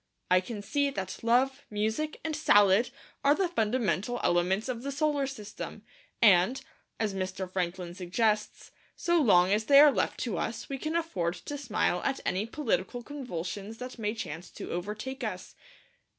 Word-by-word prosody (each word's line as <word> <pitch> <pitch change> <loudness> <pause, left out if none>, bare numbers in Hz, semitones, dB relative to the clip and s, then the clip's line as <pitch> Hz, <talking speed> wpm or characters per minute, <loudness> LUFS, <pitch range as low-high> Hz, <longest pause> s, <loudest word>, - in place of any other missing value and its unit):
I 185 0 +6
can 205 +1 -7
see 285 +6 +1
that 190 -8 -5
Love, 250 +3 +2
Music, 220 +9 -2
and 315 -1 -1
Salad 205 -6 +5 0.3
are 285 +1 +5
the 380 +1 +1
fundamental 230 - 0
elements 180 +5 +2
of 245 -3 -3
the 280 +2 -4
solar 290 -1 +1
system; 215 -6 -8 0.4
and, 205 +5 +5 0.4
as 215 -3 0
Mr. 190 0 -3
Franklin 180 -1 -3
suggests, 210 +4 -1 0.2
so 345 -1 +2
long 185 -7 +5
as 215 +1 +1
they 280 +2 +7
are 295 0 +9
left - - -1
to - - -2
us - - -3
we 275 -2 -4
can 310 +3 -3
afford 190 - -1
to 290 - -7
smile 220 -9 0
at 275 - 0
any 195 +4 0
political 245 -2 -2
convulsions 210 - -6
that 250 0 -8
may 215 0 -1
chance 170 -4 -6
to - - -8
overtake 215 +9 -4
us. 185 -5 -5
220 Hz, 165 wpm, -29 LUFS, 190-270 Hz, 0.4 s, are